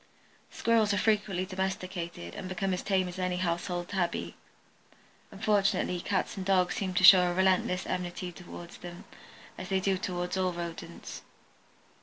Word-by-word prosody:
Squirrels 220 Hz, -3 st, +2 dB
are -, -, 0 dB
frequently 205 Hz, -3 st, +1 dB
domesticated 185 Hz, -, -4 dB
and 185 Hz, -, -6 dB
become 190 Hz, 0 st, -1 dB
as 180 Hz, -, -2 dB
tame 190 Hz, -2 st, +1 dB
as 180 Hz, +1 st, -7 dB
any 180 Hz, -1 st, 0 dB
household 175 Hz, 0 st, -2 dB
tabby. 185 Hz, -4 st, -2 dB, 0.9 s
Unfortunately 200 Hz, -3 st, +1 dB
Dogs 190 Hz, +2 st, -1 dB
and 190 Hz, -, -4 dB
Cats 180 Hz, -1 st, +2 dB
seem 185 Hz, -2 st, -2 dB
to 185 Hz, -, +2 dB
show 180 Hz, -1 st, +9 dB
a -, -, -1 dB
relentless 185 Hz, -1 st, +2 dB
enmity 180 Hz, 0 st, -3 dB
toward 175 Hz, -1 st, -10 dB
them, 175 Hz, 0 st, -10 dB, 0.5 s
as -, -, -6 dB
they 190 Hz, -1 st, +2 dB
do 190 Hz, 0 st, +1 dB
toward 180 Hz, 0 st, -3 dB
all 185 Hz, -1 st, +1 dB
rodents. 170 Hz, -1 st, -7 dB
185 Hz, 150 wpm, -30 LUFS, 175-190 Hz, 0.9 s, show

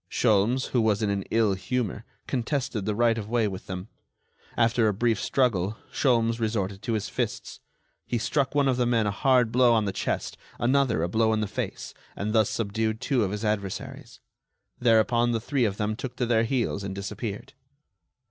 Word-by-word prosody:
Sholmes, 115 Hz, +3 st, +2 dB
who 125 Hz, -, +2 dB
was 110 Hz, -1 st, +1 dB
in 105 Hz, -, +1 dB
an 100 Hz, -1 st, -1 dB
ill 110 Hz, -3 st, +2 dB
humor, 110 Hz, +3 st, -3 dB, 0.2 s
contested 125 Hz, -4 st, -2 dB
the 105 Hz, -, -1 dB
right 115 Hz, 0 st, +2 dB
of 105 Hz, -1 st, -7 dB
way 115 Hz, -2 st, +2 dB
with 95 Hz, -2 st, -7 dB
them. 95 Hz, +1 st, -5 dB, 0.7 s
After 115 Hz, -1 st, +3 dB
a 105 Hz, -, +1 dB
brief 115 Hz, +1 st, +1 dB
struggle, 110 Hz, -6 st, +1 dB, 0.2 s
Sholmes 115 Hz, -3 st, +2 dB
resorted 100 Hz, -3 st, -2 dB
to 115 Hz, +1 st, -2 dB
his 110 Hz, -2 st, -1 dB
fists. -, -, -4 dB, 0.5 s
He 120 Hz, -, 0 dB
struck 135 Hz, +4 st, 0 dB
one 140 Hz, -1 st, +3 dB
of 130 Hz, -2 st, +2 dB
the 125 Hz, -1 st, +1 dB
men 115 Hz, -2 st, +2 dB
a 105 Hz, -, +1 dB
hard 125 Hz, +1 st, +3 dB
blow 125 Hz, 0 st, +5 dB
on 110 Hz, -2 st, +2 dB
the 100 Hz, -, -1 dB
chest, -, -, -3 dB, 0.2 s
another 125 Hz, -, +2 dB
a -, -, +1 dB
blow 110 Hz, +3 st, +2 dB
in 110 Hz, -, 0 dB
the -, -, 0 dB
face, -, -, -5 dB, 0.2 s
and 105 Hz, +2 st, -3 dB
thus 110 Hz, -2 st, +3 dB
subdued 110 Hz, 0 st, -1 dB
two 130 Hz, -3 st, +1 dB
of 95 Hz, -, 0 dB
his 105 Hz, +2 st, -4 dB
adversaries. 100 Hz, -3 st, -4 dB, 0.6 s
Thereupon 120 Hz, +1 st, +3 dB
the 115 Hz, -, 0 dB
three 125 Hz, +2 st, 0 dB
of 100 Hz, -2 st, -2 dB
them 105 Hz, 0 st, -1 dB
took 125 Hz, +1 st, -6 dB
to 125 Hz, -, -1 dB
their 115 Hz, -1 st, +2 dB
heels 115 Hz, -5 st, -1 dB
and 95 Hz, -1 st, -5 dB
disappeared. 100 Hz, +1 st, -5 dB
115 Hz, 195 wpm, -26 LUFS, 105-120 Hz, 0.7 s, blow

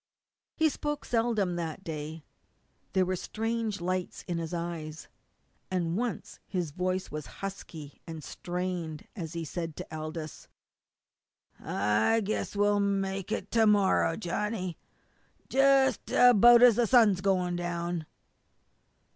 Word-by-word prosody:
He 320 Hz, -, +3 dB
spoke 295 Hz, -1 st, -3 dB
seldom 225 Hz, -7 st, +1 dB
that 165 Hz, +2 st, -4 dB
day. 155 Hz, -1 st, -6 dB, 0.7 s
There 185 Hz, 0 st, +3 dB
were 185 Hz, +1 st, -1 dB
strange 225 Hz, +1 st, -2 dB
lights 185 Hz, +1 st, -3 dB
in 175 Hz, -2 st, -2 dB
his 165 Hz, -1 st, -4 dB
eyes. 170 Hz, -3 st, -5 dB, 0.6 s
And 175 Hz, -2 st, -1 dB
once 235 Hz, +2 st, -3 dB
his 175 Hz, -5 st, -2 dB
voice 185 Hz, +3 st, -2 dB
was 150 Hz, -1 st, -5 dB, 0.2 s
husky 160 Hz, -6 st, -8 dB
and 160 Hz, -2 st, -7 dB
strained 175 Hz, -3 st, -4 dB
when 175 Hz, -6 st, -5 dB
he 165 Hz, +1 st, -5 dB
said 165 Hz, +1 st, -5 dB
to 160 Hz, -, -7 dB
Aldous: 155 Hz, 0 st, -6 dB, 1.1 s
"I 105 Hz, -, +1 dB
guess 210 Hz, 0 st, -3 dB
we'll 205 Hz, 0 st, +3 dB
make 195 Hz, -1 st, -1 dB
it 200 Hz, -, -3 dB
to 225 Hz, -1 st, +4 dB
morrow, 195 Hz, -5 st, +3 dB
Johnny 190 Hz, -2 st, -2 dB, 0.7 s
jus' 270 Hz, 0 st, +4 dB
about 240 Hz, 0 st, +7 dB
as 240 Hz, -4 st, +7 dB
the 240 Hz, -1 st, +3 dB
sun's 215 Hz, -7 st, +5 dB
going 180 Hz, -2 st, +1 dB
down." 175 Hz, -1 st, -3 dB
185 Hz, 125 wpm, -29 LUFS, 165-210 Hz, 1.1 s, about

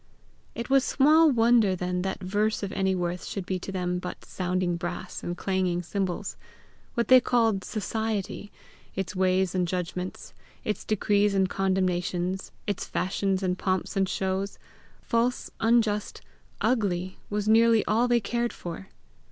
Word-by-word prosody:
It 235 Hz, -, -4 dB
was 270 Hz, -1 st, +4 dB
small 310 Hz, +5 st, +5 dB
wonder 230 Hz, -5 st, +4 dB
then 180 Hz, 0 st, -2 dB
that 190 Hz, +1 st, -3 dB
verse 210 Hz, +3 st, 0 dB
of 195 Hz, -, -3 dB
any 190 Hz, -1 st, +1 dB
worth 175 Hz, 0 st, -2 dB
should 195 Hz, -3 st, -5 dB
be 185 Hz, 0 st, -2 dB
to 195 Hz, -, -6 dB
them 180 Hz, -1 st, -1 dB
but 180 Hz, -, -7 dB
sounding 180 Hz, -1 st, -1 dB
brass 175 Hz, +1 st, -5 dB
and 175 Hz, 0 st, -4 dB
clanging 185 Hz, -2 st, 0 dB
cymbals. 185 Hz, 0 st, -3 dB, 0.6 s
What 235 Hz, -3 st, +1 dB
they 255 Hz, 0 st, +8 dB
called 225 Hz, -6 st, +2 dB
society, 215 Hz, -1 st, -3 dB, 0.4 s
its 195 Hz, 0 st, -3 dB
ways 185 Hz, 0 st, +2 dB
and 180 Hz, -2 st, +1 dB
judgments, 180 Hz, +1 st, -4 dB, 0.3 s
its 210 Hz, -, -3 dB
decrees 205 Hz, -1 st, +2 dB
and 190 Hz, -1 st, +3 dB
condemnations, 185 Hz, -1 st, -1 dB
its 205 Hz, -3 st, -2 dB
fashions 190 Hz, +1 st, -1 dB
and 180 Hz, 0 st, 0 dB
pomps 185 Hz, -1 st, -1 dB
and 195 Hz, -1 st, +1 dB
shows, 190 Hz, +1 st, -2 dB, 0.5 s
false, 235 Hz, +2 st, 0 dB
unjust, 225 Hz, -2 st, +1 dB, 0.4 s
ugly, 185 Hz, -6 st, 0 dB
was 210 Hz, 0 st, -2 dB
nearly 225 Hz, 0 st, +5 dB
all 230 Hz, +4 st, +2 dB
they 240 Hz, -1 st, +4 dB
cared 235 Hz, +2 st, -1 dB
for. 175 Hz, +2 st, -7 dB
195 Hz, 145 wpm, -27 LUFS, 185-220 Hz, 0.6 s, they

